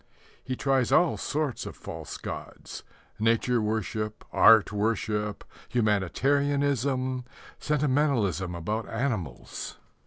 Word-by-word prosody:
He 130 - -3
tries 135 -2 +1
all 175 -1 +4
sorts 150 -3 -2
of - - -7
false - - -7
gods - - -7 0.4
nature 115 +2 +2
worship, 110 0 -2
art 110 -3 +6
worship, 105 -1 -1 0.3
humanitarianism, 130 +4 +1 0.4
sentimentalism 130 - +1
about 105 +7 -3
animals. 110 - -3
115 Hz, 90 wpm, -27 LUFS, 105-140 Hz, 0.4 s, art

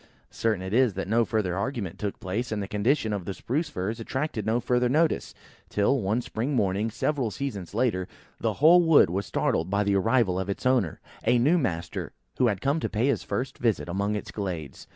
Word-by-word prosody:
Certain 110 -5 -1
it 95 +2 -5
is, 120 -5 +3
that 95 - -3
no 115 +3 +3
further 105 -6 -1
argument 100 -3 -3
took 105 -2 -3
place, 105 +7 -3
and 110 - -1
the 100 - -3
condition 110 +2 +1
of 100 -4 -3
the 100 - -4
Spruce 150 +6 -2
firs 100 +5 -3
attracted 130 -1 -3
no 115 +2 +2
further 125 0 +1
notice; 155 +5 +1 0.3
till, 110 +6 +2
one 105 +5 0
spring 125 +5 -3
morning, 100 0 +1
several 130 +2 -1
seasons 105 -7 -5
later, 105 -7 +1 0.3
the - - 0
whole 170 +5 +6
wood 160 - +5
was 95 +1 -2
startled 80 +3 0
by 100 +1 +1
the 100 -1 +1
arrival 100 -2 +2
of 95 +1 -3
its 100 - -4
owner, 125 -10 +2 0.2
a 120 +2 +4
new 150 +9 +4
master, 85 - -3 0.3
who - - +5
was 105 -5 +2
come 140 - +1
to - - -2
pay 110 +3 0
his 125 - +1
first 125 +6 -4
visit 115 -7 0
among 100 +4 -1
its 105 - -5
glades. 85 -9 -5
110 Hz, 210 wpm, -27 LUFS, 95-125 Hz, 0.3 s, whole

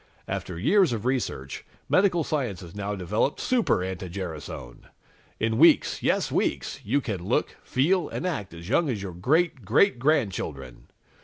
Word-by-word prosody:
"After 90 - -4
years 170 - +3
of 110 0 -4
research, 120 - -2 0.2
medical 185 -3 +3
science 125 - -2
has 85 -2 -11
now 100 0 -3
developed 105 - -1
Super 245 - +1
anti 95 0 -5
gerasone! 80 -9 -7 0.5
In 110 0 0
weeks - - +5
yes, - - +1
weeks - - -1
you 135 +8 +1
can 100 -8 -4
look, - - 0
feel 170 +8 +1
and - - -4
act 110 - -3
as 85 +1 -10
young 150 - +2
as 105 -6 -2
your 95 -3 -5
great 140 - +1
great 125 - +3
grandchildren! 95 - -1
110 Hz, 155 wpm, -26 LUFS, 90-150 Hz, 0.5 s, weeks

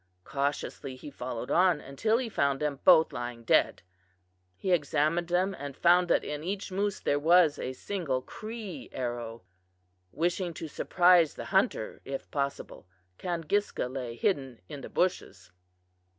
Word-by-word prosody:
Cautiously 140 0 -3
he 145 +3 -10
followed 125 -2 -5
on 180 -3 +4
until 180 +14 0
he 250 -1 -2
found 140 -10 0
them 150 -2 -2
both 160 - +6
lying 120 -1 -5
dead. - - +2 0.7
He 185 - -2
examined 155 +1 +1
them 180 +3 +1
and 140 -1 -7
found 175 +1 +5
that - - +2
in 150 0 -5
each 195 +3 -4
moose 200 +1 -1
there 145 - +1
was 165 0 +5
a 130 - -3
single 140 -5 -3
Cree 215 - -7
arrow. 120 -3 -4 0.7
Wishing 175 +1 -1
to 160 - -6
surprise 175 +1 +4
the - - -6
hunter - - +1
if 135 0 -6
possible, 140 -8 -4 0.3
Kangiska 175 -2 -1
lay 125 -3 -4
hidden 135 - -1
in 140 - -8
the - - -8
bushes. 175 - -2
150 Hz, 145 wpm, -29 LUFS, 135-180 Hz, 0.7 s, both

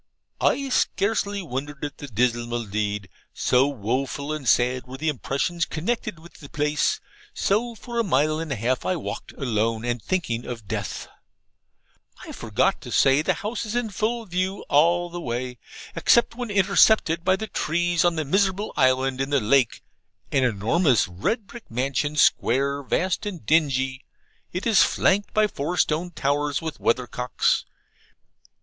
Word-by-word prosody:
I 275 -1 +1
scarcely 200 -4 0
wondered 145 0 -5
at 145 - -7
the 145 - -7
dismal 120 0 0
deed, 105 -1 -2 0.3
so 130 +2 +3
woful 135 +4 -2
and 145 -6 -2
sad 125 +1 +2
were 130 +1 -8
the 155 +3 0
impressions 150 +5 -1
connected 210 +4 -3
with 165 +2 -16
the 145 - -11
place. 150 -1 0 0.4
So, 230 +4 0
for 235 +1 -5
a - - +3
mile 155 - +1
and 165 -2 -5
a - - 0
half 125 +3 -1
I 185 - 0
walked 170 - -6
alone 115 -3 -1
and 120 -1 -1
thinking 120 - -2
of 115 -4 -7
death. - - -4 1.2
I - - -8
forgot - - 0
to - - -9
say 135 +2 +4
the - - +1
house 225 +3 -2
is 220 0 -5
in 240 -3 -1
full 225 +3 -1
view 185 +1 -2
all 170 +4 +3
the 175 0 -5
way 125 -2 -4 0.4
except 235 -1 +4
when 240 -1 -5
intercepted 195 -3 +4
by 185 +1 +3
the 215 +3 -4
trees 175 -2 0
on 175 -1 +3
the 155 -1 -2
miserable 195 +5 +1
island 130 0 +2
in 135 - -1
the 140 -1 +3
lake 125 +1 +2 0.5
an 135 - +2
enormous 125 - +2
red 105 - -2
brick 240 +3 -12
mansion, 135 +5 -1
square, 140 0 +2
vast, 185 +8 -1
and 180 -6 -6
dingy. 135 -4 +1 0.5
It 180 +2 -4
is 225 -4 +5
flanked 205 +2 +2
by 215 0 +3
four 175 -3 -3
stone 165 +3 +1
towers 145 -2 0
with 160 -2 -6
weathercocks. 125 +1 0
150 Hz, 160 wpm, -24 LUFS, 125-185 Hz, 1.2 s, is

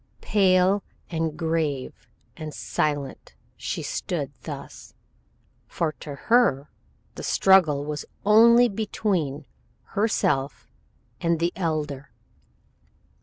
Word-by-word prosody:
Pale 190 -1 +3 0.3
and 160 -2 -2
grave 160 -5 -2 0.3
and 155 -1 -7
silent 145 -3 -3 0.2
she - - -4
stood - - -3
thus, - - -9 0.7
for 165 -2 -1
to 145 -2 -7
her 150 - +2 0.4
the - - -8
struggle 160 -7 +4
was 150 -1 -4 0.2
only 235 +3 +7
between 195 - -2 0.4
herself 150 -10 -1 0.5
and 170 -1 +1
the 170 +1 0
Elder. 150 -5 -3
165 Hz, 90 wpm, -25 LUFS, 150-195 Hz, 0.7 s, only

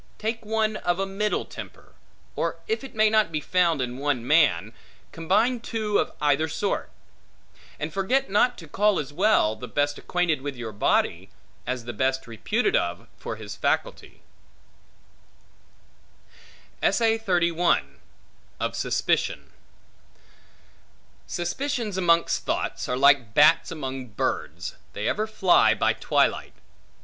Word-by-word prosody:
Take 225 +1 -3
one 215 0 0
of 175 0 -1
a 195 - 0
middle 200 +2 -1
temper; - - -11 0.4
or - - -2
if 440 -8 -1
it 270 - -10
may 215 0 +4
not 215 -4 +2
be 155 - -1
found 170 -2 +1
in 125 +1 -5
one 140 -4 -1
man, 120 - +3 0.4
combine 205 +10 +1
two 220 -3 -1
of - - -1
either 150 +1 +2
sort; 195 +6 -2 0.9
and - - -4
forget 225 +8 +1
not 225 +5 +2
to 165 - -11
call 205 +6 +2
as 145 -1 -4
well, 185 - +3
the 125 +3 -8
best 145 +1 -1
acquainted 175 -5 0
with 140 0 -5
your 120 -2 -6
body, 95 -2 0 0.4
as 125 -2 -3
the 120 - -5
best 130 +4 0
reputed 215 - -1
of - - -1
for - - -6
his - - -8
faculty. - - -2 2.6
Of 225 -1 +2 1.5
Suspicion - - -1 1.8
SUSPICIONS 225 +4 -2
amongst 170 -2 +2
thoughts, - - -2
are 125 - 0
like 140 -5 +4
bats 155 +3 +5
amongst 130 -7 -6
birds, - - -3 0.2
they 105 - -3
ever 215 +1 0
fly 195 -4 +4
by - - +2
twilight. - - 0
170 Hz, 125 wpm, -25 LUFS, 135-215 Hz, 2.6 s, bats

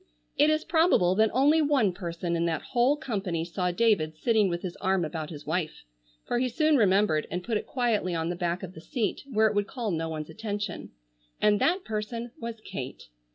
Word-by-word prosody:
It 300 - +4
is 310 0 +1
probable 320 - +4
that 220 +3 +3
only 290 +6 +4
one 275 -10 +2
person 170 -1 -3
in 170 0 0
that 160 -2 -2
whole 255 +4 +3
company 195 - -2
saw 180 +1 -1
David 175 -6 +1
sitting 220 0 +2
with 175 0 -3
his 180 -2 -4
arm 190 -2 +1
about 155 0 -5
his 150 -3 -9
wife—for - - -4
he 255 0 +1
soon 310 +5 +2
remembered 195 - +3
and 180 0 -3
put 230 +2 -2
it - - -6
quietly 225 -8 0
on 165 0 -1
the 175 - -2
back 175 +1 -2
of 185 -1 -7
the 160 - -11
seat, 225 +5 -2
where 220 -1 +3
it 215 - +3
would 205 -1 0
call 235 -3 -3
no 165 -1 -2
one's 155 -1 -5
attention—and 180 - -3
that 360 +3 +2
person 225 +2 -4
was 230 -1 -6
Kate. 135 - -7
195 Hz, 200 wpm, -28 LUFS, 165-230 Hz, -, It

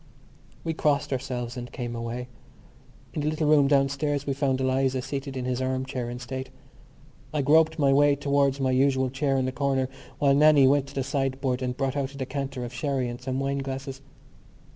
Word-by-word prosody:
We 165 - -1
blessed 145 -3 +1
ourselves 125 -2 -3
and 125 -1 -7
came 120 -2 -5
away. 115 +1 -4 0.9
In 150 - -2
the 145 - -1
little 155 0 -1
room 150 -2 +5
downstairs 140 +1 +1
we 140 - 0
found 135 -1 0
Eliza 130 0 +1
seated 135 -1 -4
in 125 - -3
his 125 0 -1
arm 130 0 -1
chair 125 -3 -4
in 120 - -5
state. 130 +2 -6 0.8
I 150 -2 0
groped 160 +3 +4
my 140 -3 +3
way 145 +1 +5
towards 140 -1 +1
my 130 -1 +1
usual 130 0 +2
chair 135 0 0
in 130 - +1
the 130 - -1
corner 135 -1 0 0.3
while 140 -1 +3
Nannie 145 -1 +6
went 140 0 +3
to 140 - -12
the 135 - 0
sideboard 135 -1 -1
and 125 -1 -2
brought 135 -1 -1
out 140 -1 -2
a - - -10
decanter 135 -1 -4
of 120 - -8
sherry 130 0 -1
and 120 +1 -7
some 130 +1 -2
wine 140 0 -1
glasses. 135 0 -5
135 Hz, 200 wpm, -26 LUFS, 130-140 Hz, 0.9 s, Nannie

